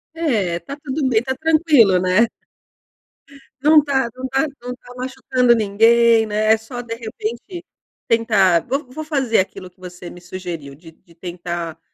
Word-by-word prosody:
É, 210 - 0
tá 280 - -9
tudo 275 0 -2
bem, 220 -3 +3
está 260 +2 -3
tranquilo 300 - +4
né. 185 +6 +3 1.3
Não 300 0 +6
tá 265 -4 0
não 260 +1 -5
tá 270 +4 0
não 250 0 -5
tá 245 0 -15
machucando 255 -1 +1
ninguém, 225 +2 +4
né, 215 +1 +2
só 245 +3 -8
de 230 -1 -6
repente 235 - -6 0.4
tentar 200 -7 +3
vou 275 +3 -2
vou 310 +4 -6
fazer 270 -7 +1
aquilo 190 -1 -4
que 180 - -35
você 180 -1 -10
me 175 - -12
sugeriu 175 -6 -7
de 165 +2 -15
de 170 0 -25
tentar 175 -2 -6
230 Hz, 155 wpm, -20 LUFS, 185-260 Hz, 1.3 s, Não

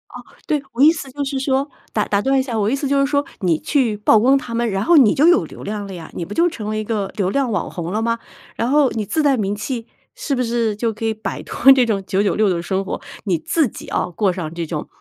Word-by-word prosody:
哦， - - -9 0.2
对， 300 -2 +1
我 245 - -2
意 305 - +8
思 285 -5 -6
就 285 +2 -3
是 270 0 -3
说， 270 +1 0 0.2
打 210 - 0
打 200 0 +1
断 270 +2 +2
一 - - +3
下， 245 -4 -3
我 205 - +1
的 220 - +1
意 - - +2
思 280 0 -2
就 280 0 +2
是 275 - +3
说 285 0 0 0.2
你 170 -5 +1
去 245 -8 0
曝 210 +1 +4
光 265 +5 +4
他 235 -3 -5
们， 235 -1 0
然 195 0 -1
后 340 +1 +4
你 250 -8 +6
就 295 +4 +4
有 350 0 +5
流 - - -11
量 205 0 -4
了 195 - -8
呀， 165 -3 -9
你 170 - -4
不 195 - -7
就 345 +1 +3
成 215 -8 -6
为 215 - -2
一 215 - -2
个 210 -3 -2
流 190 -3 +1
量 260 +3 0
网 200 -5 -2
红 175 -1 -5
了 215 +3 -1
吗？ 230 0 0 0.4
然 235 - -1
后 290 -2 +4
你 215 -1 -3
自 310 +10 0
带 280 -2 +3
名 205 -3 -1
气， 230 +2 -4 0.3
是 - - -3
不 255 - 0
是 230 -3 0
就 225 +1 -1
可 215 - -9
以 225 0 +1
摆 220 0 -5
脱 270 - +5
这 255 -2 +3
种 210 -4 0
996 205 +1 +2
的 170 -2 0
生 190 +2 -1
活， - - -4 0.3
你 180 -5 +1
自 300 - +1
己 - - -10
要 - - -1
过 190 +3 +1
上 170 -3 -5
这 170 0 -3
种， 155 -2 -5
225 Hz, 305 characters per minute, -20 LUFS, 200-270 Hz, 0.4 s, 意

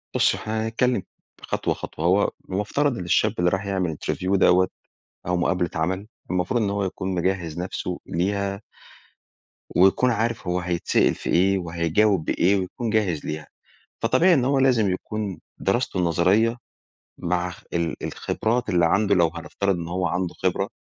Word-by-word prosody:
بُصّي - - +3
هو - - -9
احنا 110 +1 -2
هنتكلم 115 -2 +1 0.4
خطوة - - -1
خطوة، 80 - -6
هو 95 +4 +3 0.2
المفترض 110 +8 0
إن 90 - -4
الشاب 105 +4 +2
اللي 90 0 +4
راح 95 +2 -2
يعمل 90 -5 -1
interview 95 +6 -1
دَوَّة 95 0 +5 0.6
أو 90 0 +1
مقابلة 90 0 +1
عمل، 95 +5 -1 0.2
المفروض 90 +7 0
إن 100 - 0
هو 100 0 -1
يكون 95 0 -3
مجهز 85 -2 -1
نفسه 90 0 -4
ليها 100 +3 -1 1.1
ويكون 95 +7 +4
عارف 115 -2 -1
هو 90 +1 +1
هيتسأل 90 -1 +1
في - - -6
إيه 95 +3 +3
وهيجاوب 85 +2 +1
بإيه 95 +3 +2
ويكون 100 +5 -3
جاهز 100 -8 0
ليها. 75 -1 -5 0.6
فطبيعي 130 +11 +4
إن 135 -6 +2
هو 135 +1 +2
لازم 125 -7 +3
يكون 100 0 -4 0.2
دراسته 95 -1 0
نظرية 90 +7 +3 0.6
مع 90 +1 -1
اخ 90 - -11
ال 85 -1 0
الخبرات 120 +2 -1
اللي 85 -4 +3
عنده 100 +3 +3
لو 85 -3 +3
هنفترض 85 +4 -1
إن 85 -1 -5
هو 90 +1 -1
عنده 90 +1 -2
خبرة 95 +2 -1
95 Hz, 160 wpm, -24 LUFS, 90-105 Hz, 1.1 s, دَوَّة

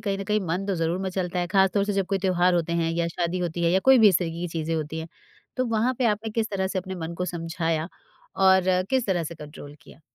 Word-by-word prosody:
कहीं 195 0 -1
न 195 - -4
कहीं 210 +1 +1
मन 180 +4 -2
तो 200 - 0
ज़रूर 165 +1 -1
मचलता 180 -1 -2
है। 175 - -1
खासतौर 195 +1 +2
से 205 - -1
जब 195 -2 0
कोई 195 -1 0
त्योहार 180 -1 +2
होते 170 -1 0
हैं, 165 -1 0
या 170 0 0
शादी 170 +1 -2
होती 175 -1 -3
है, 170 - +3
या 190 - +3
कोई 265 -1 +7
भी 220 -2 +8
इस 185 -3 +3
तरीके 170 -2 -4
की 175 - -3
चीज़ें 165 0 -3
होती 155 0 -3
हैं, 160 +1 -6 0.5
तो 255 - +1
वहाँ 230 +2 +1
पे 255 - +1
आपने 215 +1 -1
किस 220 0 -1
तरह 190 -2 -1
से 190 0 -2
अपने 185 0 -5
मन 170 -1 -5
को 180 - -3
समझाया 165 -2 -2 0.5
और 190 0 +5 0.3
किस 260 -4 +1
तरह 175 -4 0
से 165 +2 -6
कंट्रोल 150 -1 -11
किया? - - -17
180 Hz, 265 wpm, -25 LUFS, 165-195 Hz, 0.5 s, भी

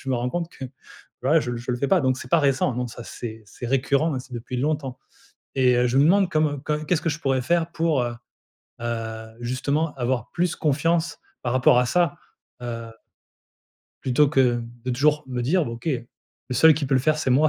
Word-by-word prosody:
Je 135 - -9
me 130 - +2
rends 120 +1 -1
compte 170 +1 -2
que, 135 - -9 0.6
voilà 150 +5 +4
je 120 -3 -3
je 120 +1 -4
le 120 - -1
fais 140 +3 -1
pas 185 -4 +4
donc 130 -1 +1
c'est 125 - -9
pas 170 - +4
récent, 135 -2 +2
non, 125 0 -1
ça 120 +1 -9
c'est 110 -2 -7
c'est 115 +4 -9
récurrent 140 +3 +1
et - - -2
c'est 130 0 -12
depuis 120 +1 -5
longtemps. 140 -1 -1 0.6
Et 125 -1 +4
heu, 125 - +3
je 130 +3 +2
me 140 - +6
demande 190 +2 +4
comme 150 -3 0
comme 150 0 -2
qu'est-ce 165 0 +1
que - - 0
je 150 - -3
pourrais 135 -4 0
faire 170 +3 +1
pour, 165 -5 +1
heu 120 -1 -2 0.7
heu, 110 -1 -4
justement 140 +6 -1
avoir 120 -2 -1
plus 175 -1 0
confiance 160 +2 +1 0.2
par 120 0 -1
rapport 125 -1 +5
à 125 - +2
ça? 170 +3 +1 0.4
Heu 115 -1 -5 1.1
plutôt 135 +3 +3
que 125 -4 +2 0.2
de 130 - -1
toujours 150 +4 +2
me 125 -1 -3
dire: 170 +7 +2
«B - - -4
OK 115 +7 -5 0.6
le 125 - -1
seul 160 +5 +7
qui 145 0 -2
peut 135 - -2
le 130 - +4
faire 155 +3 +2
c'est 135 - 0
moi». 150 +5 +5
135 Hz, 220 wpm, -24 LUFS, 125-155 Hz, 1.1 s, seul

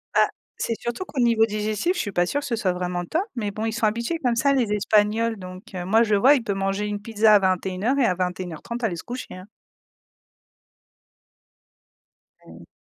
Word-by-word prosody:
Bah, - - +5 0.3
c'est 230 - -2
surtout 240 +9 -4
qu'au 275 - -6
niveau 230 -2 +4
digestif, 215 - -1
je - - -3
suis 205 - -4
pas 175 -1 +2
sûre 285 +9 -1
que - - -7
ce 235 - 0
soit 190 -5 0
vraiment 180 0 -3
top, 330 - 0
mais 210 -4 -2
bon, 215 +2 -4
ils 225 - -1
sont 225 -1 0
habitués 235 +10 -1
comme 245 -2 +2
ça 275 +4 +3
les 245 -6 +1
espagnols, 215 +2 +2
donc, 185 +1 -9
heu, 180 -1 -4
moi 220 +5 +4
je 215 -2 +2
vois, 260 +8 +6
il 250 - -1
peut 205 - -1
manger 195 +1 -1
une 205 0 -3
pizza 215 -1 +4
à 205 - +7
21:00 190 +6 0
et 255 - +4
à 185 - +3
21:30 180 +5 -4
aller 195 -6 0
se 165 - -8
coucher, 245 -5 -7
hein. 185 +2 -11 3.0
Mmh. - - -14
215 Hz, 205 wpm, -24 LUFS, 190-235 Hz, 3.0 s, à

